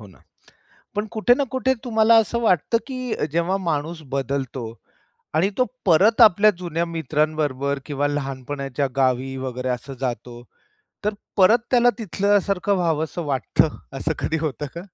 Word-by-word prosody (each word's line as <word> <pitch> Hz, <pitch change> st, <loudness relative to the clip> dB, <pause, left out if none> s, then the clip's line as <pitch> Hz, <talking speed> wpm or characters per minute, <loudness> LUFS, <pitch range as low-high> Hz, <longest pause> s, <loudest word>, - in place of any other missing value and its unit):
हो 105 Hz, -, -11 dB
ना. 95 Hz, -, -19 dB, 0.7 s
पण 210 Hz, +1 st, -1 dB
कुठे 230 Hz, +2 st, +3 dB
ना 280 Hz, -, +2 dB
कुठे 260 Hz, 0 st, +2 dB
तुम्हाला 225 Hz, -1 st, +4 dB
असं 225 Hz, +1 st, +2 dB
वाटतं, 215 Hz, +2 st, +2 dB
की 255 Hz, -3 st, -4 dB, 0.2 s
जेव्हा 170 Hz, +4 st, +1 dB
माणूस 165 Hz, -2 st, -3 dB
बदलतो 135 Hz, -2 st, -2 dB, 0.7 s
आणि 185 Hz, +5 st, +3 dB
तो 255 Hz, -, +3 dB, 0.2 s
परत 205 Hz, +8 st, +4 dB
आपल्या 215 Hz, 0 st, +7 dB
जुन्या 170 Hz, -1 st, -2 dB
मित्रांबरोबर 150 Hz, -3 st, -1 dB
किंवा 145 Hz, 0 st, -1 dB
लहानपणाच्या 140 Hz, -1 st, -3 dB
गावी 130 Hz, 0 st, +1 dB
वगैरे 130 Hz, -1 st, -4 dB
असं 125 Hz, +2 st, -4 dB
जातो, 120 Hz, -1 st, -4 dB, 0.6 s
तर 210 Hz, -, 0 dB, 0.2 s
परत 205 Hz, +5 st, +6 dB
त्याला 245 Hz, -1 st, +5 dB
तिथल्यासारखं 200 Hz, -1 st, +1 dB
व्हावंस 160 Hz, -2 st, -1 dB
वाटतं 145 Hz, 0 st, 0 dB, 0.2 s
असं 155 Hz, +4 st, -1 dB
कधी 160 Hz, -, -1 dB
होतं 150 Hz, -1 st, -3 dB
का? 170 Hz, -, -5 dB
160 Hz, 140 wpm, -22 LUFS, 135-205 Hz, 0.7 s, आपल्या